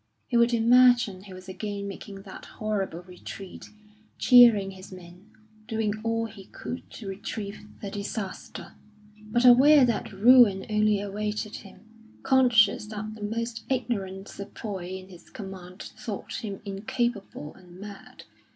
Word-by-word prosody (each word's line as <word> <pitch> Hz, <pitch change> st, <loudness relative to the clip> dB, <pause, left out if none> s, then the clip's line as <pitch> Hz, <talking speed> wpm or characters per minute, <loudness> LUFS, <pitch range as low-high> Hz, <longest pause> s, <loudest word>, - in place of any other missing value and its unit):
He 245 Hz, -, -4 dB
would 235 Hz, 0 st, +5 dB
imagine 240 Hz, -3 st, +4 dB
he 195 Hz, -, -11 dB
was 185 Hz, +1 st, -12 dB
again 200 Hz, +1 st, -5 dB
making 195 Hz, 0 st, -9 dB
that 190 Hz, -, -11 dB
horrible 195 Hz, -5 st, -2 dB
retreat, 185 Hz, +1 st, -10 dB, 0.5 s
cheering 235 Hz, -6 st, +6 dB
his 190 Hz, 0 st, -12 dB
men, 180 Hz, +2 st, -13 dB, 0.4 s
doing 220 Hz, -3 st, -1 dB
all 230 Hz, 0 st, -1 dB
he 205 Hz, -3 st, -11 dB
could 250 Hz, -, -8 dB
to 215 Hz, -, -9 dB
retrieve 200 Hz, +1 st, -6 dB, 0.2 s
the 200 Hz, -, -4 dB
disaster; 200 Hz, -1 st, -6 dB, 0.5 s
but 240 Hz, +4 st, +1 dB
aware 265 Hz, +3 st, +8 dB
that 235 Hz, -2 st, -2 dB
ruin 215 Hz, -1 st, +6 dB
only 210 Hz, -1 st, +3 dB
awaited 210 Hz, +1 st, -4 dB
him, 195 Hz, -, -14 dB, 0.4 s
conscious 235 Hz, -6 st, +4 dB
that 215 Hz, 0 st, -6 dB
the 215 Hz, -, -12 dB
most 230 Hz, +2 st, -3 dB
ignorant 200 Hz, -7 st, -2 dB
sepoy 200 Hz, -2 st, -7 dB
in 185 Hz, 0 st, -12 dB
his 175 Hz, -2 st, -15 dB
command 190 Hz, -2 st, -9 dB, 0.2 s
thought 215 Hz, +2 st, -6 dB
him 200 Hz, -3 st, -5 dB
incapable 200 Hz, -4 st, -3 dB
and 180 Hz, -1 st, -16 dB
mad. 200 Hz, 0 st, -11 dB
210 Hz, 135 wpm, -27 LUFS, 195-230 Hz, 0.5 s, aware